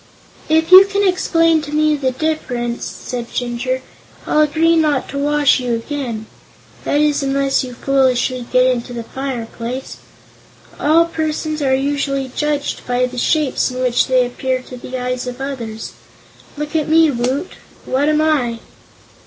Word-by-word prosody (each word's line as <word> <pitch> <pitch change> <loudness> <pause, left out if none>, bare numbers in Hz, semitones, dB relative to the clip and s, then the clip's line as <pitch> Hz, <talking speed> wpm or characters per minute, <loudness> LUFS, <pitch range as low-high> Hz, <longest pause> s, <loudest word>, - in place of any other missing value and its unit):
"If 320 +2 +2
you 375 +1 +11
can 400 0 +1
explain 330 -3 +2
to 295 -1 -8
me 305 0 +2
the 270 -3 0
difference," 255 -4 -2
said 240 -2 -6
Jinjur, 250 +1 -2 0.4
"I'll 305 - +2
agree 320 +2 +3
not 305 -4 +1
to 280 - -4
wash 290 -1 +3
you 245 -2 -1
again 230 -3 -4 0.6
that 290 - +1
is, 300 -1 +2
unless 275 0 +1
you 250 -1 -7
foolishly 255 -2 +1
get 255 0 +4
into 245 -1 -1
the 235 -1 -5
fireplace. 250 -1 -5 0.8
All 320 +3 +4
persons 310 -1 -3
are 265 -2 +2
usually 275 -1 -1
judged 295 -1 -2
by 250 0 +1
the 250 0 -5
shapes 300 0 +1
in 255 0 -6
which 250 -1 +2
they 255 -1 +3
appear 255 +1 -2
to 255 - -10
the 250 +1 -6
eyes 250 0 -3
of 250 0 -6
others. 240 -5 -5 0.7
Look 300 +2 -5
at 310 -1 0
me, 320 -1 +5
Woot; 260 +7 -2 0.3
what 275 +3 +1
am 305 0 +2
I?" 275 -7 +1
270 Hz, 155 wpm, -18 LUFS, 250-305 Hz, 0.8 s, you